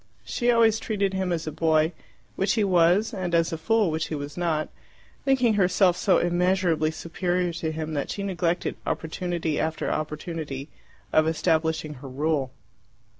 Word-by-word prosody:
She 240 - -1
always 225 -2 +4
treated 200 -3 -1
him 190 -1 -1
as 165 -2 -1
a 155 - -3
boy, 160 +1 +2 0.4
which 195 - +1
he 220 - +2
was, 185 +4 +3
and 180 -4 -1
as 165 0 +2
a - - 0
fool, 210 +2 +2
which 155 0 -2
he 155 - -3
was 145 0 -6
not, 165 -3 -1 0.6
thinking 255 -4 +3
herself 185 -2 +3
so 190 - +3
immeasurably 175 -2 +2
superior 175 +2 -2
to 160 -1 -3
him 155 0 -4
that 145 -2 -2
she 200 - -3
neglected 180 -3 -1
opportunity 165 -1 -2
after 160 0 -1
opportunity 150 -2 -4 0.4
of 155 0 +4
establishing 160 -1 0
her 135 - -8
rule. 140 0 0
170 Hz, 160 wpm, -25 LUFS, 155-190 Hz, 0.6 s, always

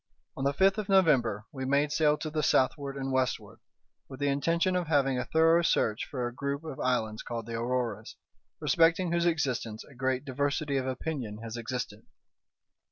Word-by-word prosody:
On 135 - -4
the 140 - +3
fifth 195 +7 +3
of 210 -1 -5
November 130 - +3
we 130 -2 -6
made 140 +2 +2
sail 150 -1 +3
to 155 - -5
the 155 0 0
southward 140 0 +1
and 135 0 -3
westward, 130 -1 -1 0.5
with 130 -1 -9
the 145 0 +1
intention 165 +6 +1
of 180 -2 -1
having 135 -4 +2
a 125 - -2
thorough 165 +3 +4
search 110 -9 +1
for 125 -3 -4
a 120 - -7
group 140 +3 -3
of 155 -5 -7
islands 110 -4 0
called 115 -2 -5
the 115 - -7
Auroras, 115 -2 -2 0.4
respecting 165 +2 +3
whose 170 0 +2
existence 125 -9 -1
a 140 - -17
great 130 +1 -1
diversity 140 +1 -1
of 130 -1 -1
opinion 130 -5 -4
has 115 0 -6
existed. 115 -2 -4
135 Hz, 180 wpm, -29 LUFS, 125-155 Hz, 0.5 s, thorough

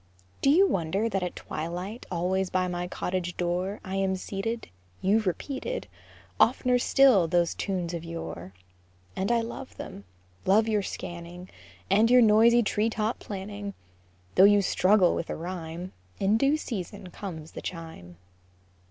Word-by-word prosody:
Do 275 - +4
you 365 +7 +6
wonder 190 - 0
that 195 -4 -1
at 180 -1 -3
twilight 180 +8 -5
Always 185 +2 0
by 185 0 +1
my 175 0 -3
cottage 180 -1 -3
door 180 +3 -1
I 190 +1 -3
am 190 -1 +1
seated? 200 +5 -4 0.3
You've 205 +2 +2
repeated 275 - -3 0.5
Oft'ner 250 +1 +4
still 250 -13 +5
those 170 0 +2
tunes 180 -4 -3
of 170 -1 -4
yore; 165 - -6 0.6
And 195 +4 0
I 235 -1 +3
love 235 +3 -7
them, 100 - -8 0.4
love 215 +4 +4
your 215 -2 +2
scanning 175 -1 -7 0.4
And 215 +4 +4
your 250 0 +7
noisy 230 +2 +6
tree 210 +1 +1
top 220 +1 -2
planning; 200 0 -6 0.6
Though 190 - +7
you 205 0 +5
struggle 185 0 +4
with 170 - -3
a - - -2
rhyme, 175 +1 -6 0.3
In 195 +2 +3
due 275 +6 +3
season 195 - -6
comes 160 -6 -7
the - - -8
chime. 160 - -8
190 Hz, 150 wpm, -27 LUFS, 175-220 Hz, 0.6 s, your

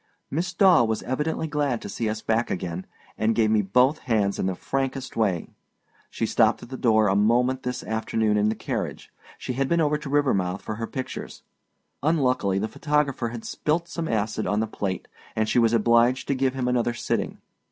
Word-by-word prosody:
Miss 170 +5 -1
Daw 185 -6 +5
was 110 -1 -2
evidently 150 +5 -1
glad 145 -5 0
to - - -5
see 115 -2 -2
us 110 0 -4
back 115 +1 +1
again, 90 0 -4 0.3
and 110 +1 +2
gave 110 -1 +3
me 110 -1 +4
both 125 +10 +3
hands 105 -5 0
in - - 0
the 95 - -1
frankest 135 +4 -3
way. 100 -7 0 0.6
She - - -2
stopped - - +2
at - - -11
the 130 - -5
door 110 -4 +3
a 95 - +2
moment 120 +5 +2
this 125 0 -4
afternoon 110 -1 0
in 105 0 +3
the 110 - -1
carriage; - - -4 0.3
she 125 - -4
had 135 +2 -1
been 170 - +2
over 150 -1 +2
to 150 - -7
Rivermouth 100 -11 +1
for 110 - -5
her 115 0 -3
pictures. 130 -1 -6 0.6
Unluckily 130 - +1
the 105 +3 0
photographer 145 -3 0
had 115 -1 -7
spilt 165 +3 -1
some 165 -1 -4
acid 110 -2 -1
on 105 - +1
the 110 - +1
plate, 100 -4 -4 0.3
and 110 0 +1
she 120 - +2
was 115 -1 +4
obliged 120 +3 +3
to - - +3
give 130 0 0
him 130 -2 -1
another 120 -1 +1
sitting. - - -2
120 Hz, 200 wpm, -25 LUFS, 110-135 Hz, 0.6 s, Daw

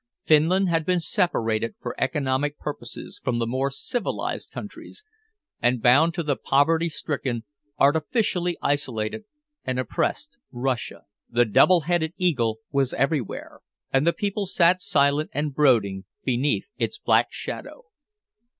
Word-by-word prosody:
Finland 170 +5 +4
had 165 -2 +1
been 180 +2 +1
separated 115 - 0
for - - -5
economic 145 -1 0
purposes 120 -6 -7
from 125 -2 0
the 115 - 0
more 130 +4 0
civilized 200 - -3
countries, 425 - -9 0.6
and 120 0 +2
bound 135 +8 +5
to 170 - -1
the 145 -2 0
poverty 160 +6 +2
stricken, 135 -7 -3 0.3
artificially 175 - +1
isolated 140 - -1 0.4
and 130 -1 -2
oppressed 275 - -2
Russia. 125 -1 -3 0.3
The 120 0 +3
double 170 - +5
headed 165 0 0
eagle 125 -12 +1
was 135 -2 +1
everywhere, 135 -4 -2 0.3
and 135 +4 +3
the - - +6
people 200 +1 -2
sat 180 0 +3
silent 150 -5 +2
and 145 0 -1
brooding 110 -10 +2 0.2
beneath 135 - 0
its - - -1
black - - +3
shadow. - - -7
145 Hz, 130 wpm, -24 LUFS, 125-170 Hz, 0.6 s, the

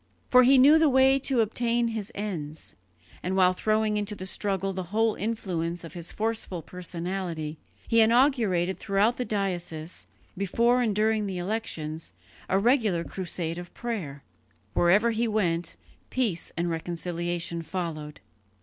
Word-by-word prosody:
For 255 - +8
he 265 +2 +6
knew 290 +5 +7
the 315 -2 +5
way 265 +1 +5
to 265 -3 +2
obtain 235 +2 +1
his 220 -3 -4
ends; 160 -7 -5 0.5
and 185 +1 -2
while 185 -1 +5
throwing 215 +2 +1
into 210 0 -2
the 185 - -7
struggle 195 0 -2
the 185 -1 -4
whole 220 +2 +2
influence 175 -7 -3
of 165 -2 -9
his 170 -2 -5
forceful 215 -6 -3
personality, 175 -3 -4 0.3
he 230 - +3
inaugurated 220 -7 +3
throughout 205 +5 +2
the 250 - -2
diocese, 175 -6 -3 0.3
before 235 +6 +2
and 220 -4 +1
during 215 0 +2
the 190 -2 -4
elections, 165 - -4 0.4
a 190 - +3
regular 215 -6 +2
crusade 170 +1 -4
of 175 0 -10
prayer. 175 - -5 0.5
Wherever 205 +7 +4
he 230 +1 0
went, 175 -6 0 0.3
peace 220 -10 -1
and 170 +1 0
reconciliation 170 0 -3
followed. 160 -4 -5
195 Hz, 140 wpm, -27 LUFS, 170-225 Hz, 0.5 s, For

